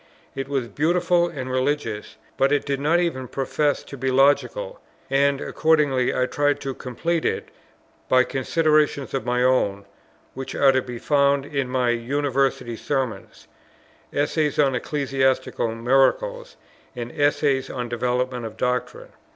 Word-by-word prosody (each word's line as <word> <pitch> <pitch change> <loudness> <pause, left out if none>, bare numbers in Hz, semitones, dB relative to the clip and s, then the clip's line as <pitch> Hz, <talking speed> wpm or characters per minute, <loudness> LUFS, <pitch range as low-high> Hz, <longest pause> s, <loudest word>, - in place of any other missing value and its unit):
It 135 0 -4
was 135 -4 -1
beautiful 175 - +2
and 135 -6 -6
religious, 130 -5 -2 0.2
but 135 +1 +2
it 145 -1 +1
did 140 -1 -1
not 155 +5 +2
even 145 -8 -2
profess 145 +3 -1
to - - -10
be 130 0 -2
logical; 145 - +2 0.3
and 140 0 +3
accordingly 145 -7 +2
I 130 - +1
tried 145 +2 0
to 135 - -3
complete 160 +7 -2
it - - -2 0.6
by 130 0 +5
considerations 150 +2 +1
of 135 -2 -3
my 125 0 +1
own, 100 -6 +1 0.5
which 135 0 -6
are 140 -1 +5
to 130 0 +1
be 125 -1 -7
found 140 +1 +2
in 140 -3 -2
my 125 -1 +1
University 130 0 -1
Sermons, 130 -1 -4 0.6
Essay 150 +1 +1
on 140 -2 +4
Ecclesiastical 130 -4 0
Miracles, 475 - +1 0.4
and 120 -1 -5
Essay 145 -2 +1
on 125 -2 -4
Development 125 +1 -1
of 110 -1 -7
Doctrine. 125 +1 -2
135 Hz, 140 wpm, -23 LUFS, 125-145 Hz, 0.6 s, by